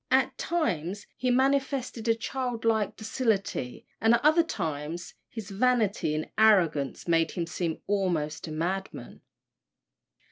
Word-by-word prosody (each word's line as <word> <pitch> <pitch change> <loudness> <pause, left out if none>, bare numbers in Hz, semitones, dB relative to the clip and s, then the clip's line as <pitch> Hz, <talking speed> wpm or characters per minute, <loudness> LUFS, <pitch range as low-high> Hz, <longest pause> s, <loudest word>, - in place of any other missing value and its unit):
At 260 -1 +3
times 200 - -1
he 250 +1 -1
manifested 265 -2 +1
a 225 - +4
childlike 230 -4 -1
docility, 215 - -2 0.2
and 225 +1 +5
at 255 - -2
other 310 +3 +6
times 160 - -4 0.2
his 220 -3 -7
vanity 210 -7 +1
and 155 - -2
arrogance 180 -12 +3
made 165 -1 +3
him 175 -3 -3
seem 165 -1 -3
almost 175 -7 -1
a - - -6
madman. 180 +5 -4
205 Hz, 120 wpm, -28 LUFS, 165-250 Hz, 0.2 s, other